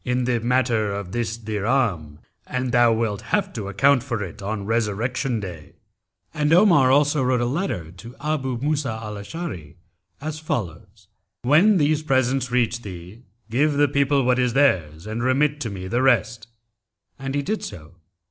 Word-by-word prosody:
in 125 0 0
the 120 -1 +1
matter 120 -3 +1
of 100 -2 -5
this 115 0 -2
dirham, 105 - -1 0.3
and 125 -1 -2
thou 120 -1 +5
wilt 110 -3 -1
have 200 -2 -1
to 105 -4 -5
account 130 +7 +3
for 120 -4 -3
it 95 +3 -9
on 100 0 -4
Resurrection 115 +3 -1
Day.'[FN#273] 90 -7 -8 0.7
And 150 +1 +2
Omar 170 -8 +5
also 145 +1 +3
wrote 125 -1 +2
a 120 - 0
letter 120 - -3
to 95 +6 -11
Abú 135 -4 -2
Músá 140 -5 -1
al 105 -1 -6
Ashári[FN#274] 100 - -7 0.4
as 155 +1 -5
follows, 105 - -5 0.4
'When 170 - +5
these 150 -1 +2
presents 130 -3 +1
reach 120 -1 0
thee, 95 +1 -10 0.3
give 145 +5 +2
the 145 +1 +3
people 140 0 +2
what 125 0 +2
is 125 -2 +1
theirs 90 - +1
and 110 +2 -4
remit 140 +4 +1
to 115 - -3
me 95 -2 -6
the 120 +6 0
rest.' 115 -3 +1 0.7
And 135 0 -4
he 145 - 0
did 215 +7 -2
so. 80 -1 -9
120 Hz, 165 wpm, -23 LUFS, 105-140 Hz, 0.7 s, thou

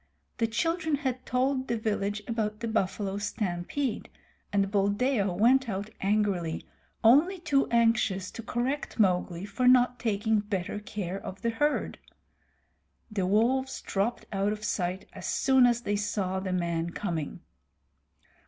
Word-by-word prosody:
The 230 - +2
children 320 +6 0
had 260 -3 -3
told 260 +1 +1
the 235 - 0
village 210 -1 -1
about 215 -2 -2
the 230 - -2
buffalo 200 -2 -1
stampede, 210 +5 -2 0.4
and 200 -1 +1
Buldeo 205 +1 +1
went 240 +7 +3
out 200 +2 -4
angrily, 195 -5 0 0.4
only 295 - +5
too 295 -5 +1
anxious 225 -5 +2
to - - -7
correct 250 +5 -2
Mowgli 180 -3 +1
for 210 +5 0
not 250 -1 +5
taking 220 -1 +1
better 205 -2 -3
care 195 -3 -5
of 190 - -8
the 230 - +1
herd. 295 +6 0 1.1
The 195 -4 0
wolves 250 +7 +2
dropped 205 +5 -1
out 195 +1 +1
of 215 0 -5
sight 185 -2 -2
as - - -7
soon 265 -2 +4
as 240 -1 +1
they 205 -3 -1
saw 200 -2 -1
the 190 0 -3
man 170 -2 -1
coming. 165 -7 -3
215 Hz, 140 wpm, -28 LUFS, 195-245 Hz, 1.1 s, only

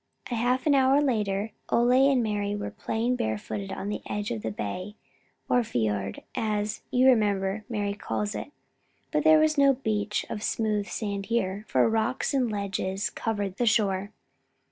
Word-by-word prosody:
A - - 0
half 245 +3 +1
hour 275 -2 +5
later 215 -6 0 0.2
Ole 250 +3 +4
and 255 -3 +2
Mari 205 -1 -1
were 205 - -4
playing 235 +3 -1
barefooted 110 - -3
on 195 +1 -4
the 210 - -3
edge 205 0 -3
of 110 - -3
the 110 - -2
bay, 180 - -5 0.5
or 245 - +3
fiord, 105 - -2
as, 210 -1 -1
you 250 +1 +3
remember, 210 -4 +2
Mari 205 -3 -1
calls 210 0 -3
it. - - -6 0.6
But 300 -1 +1
there 315 0 +7
was 310 -1 +3
no 275 -1 +6
beach 210 -4 -1
of 210 - -5
smooth 210 -2 0
sand 200 0 -3
here, 210 -3 -1
for - - +3
rocks 225 +5 0
and 255 -4 +1
ledges 195 -1 -2
covered 205 -4 -3
the 240 - +1
shore. 200 -2 +2
210 Hz, 165 wpm, -27 LUFS, 200-245 Hz, 0.6 s, there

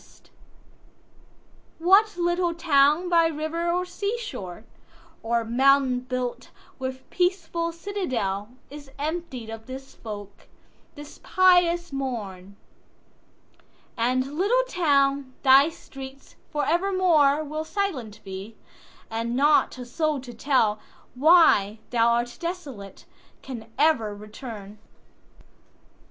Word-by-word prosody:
What 390 +4 +4
little 345 0 0
town 305 +1 +3
by 335 -2 +4
river 325 +2 -2
or 360 +1 0
sea 400 +5 -3
shore, 220 - -7 0.6
Or 230 0 0
mountain 265 +2 +3
built 250 -1 -4 0.3
with 260 0 -5
peaceful 345 -2 0
citadel, 260 - -3 0.2
Is 290 -1 -10
emptied 295 -6 -4
of 225 +1 -9
this 265 +1 -9
folk, 205 -2 -9 0.5
this 290 0 -11
pious 350 -3 +3
morn? 205 -8 -5 1.4
And, 255 +4 0
little 480 +7 +3
town, 280 - +1
thy 275 +3 +7
streets 270 -3 -12
for 295 -1 -1
evermoreWill 315 -4 +2
silent 275 - -3
be; 195 +3 -8 0.5
and 230 +1 -3
not 290 0 +3
a 250 - -7
soul 305 +3 -1
to 245 -2 -10
tellWhy 240 - +3
thou 235 -1 +3
art 235 +1 0
desolate, 295 - -7 0.4
can 235 -4 -8
e'er 250 -9 +2
return. 210 -1 -10
275 Hz, 100 wpm, -25 LUFS, 235-335 Hz, 1.4 s, thy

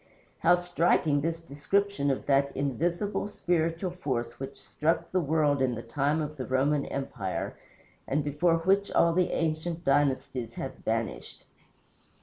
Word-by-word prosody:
How 175 +2 +5
striking 175 -4 +2
this 165 +2 -1
description 165 +2 0
of 135 - -1
that 140 0 +2
invisible, 170 - -1
spiritual 175 -2 -1
force 125 -9 -3
which 135 +1 -7
struck 160 +2 -1
the 185 - +2
world 150 -3 +2
in 125 -2 +1
the 115 - -6
time 145 +6 0
of 150 0 -6
the 130 - -4
Roman 140 +2 +1
empire, 125 -9 -3 0.5
and 145 +2 0
before 150 +4 +2
which 195 +3 +3
all 170 0 +4
the 180 +1 +2
ancient 165 +1 -1
dynasties 135 -4 +1
have - - -5
vanished! - - -3
150 Hz, 140 wpm, -28 LUFS, 135-170 Hz, 0.5 s, How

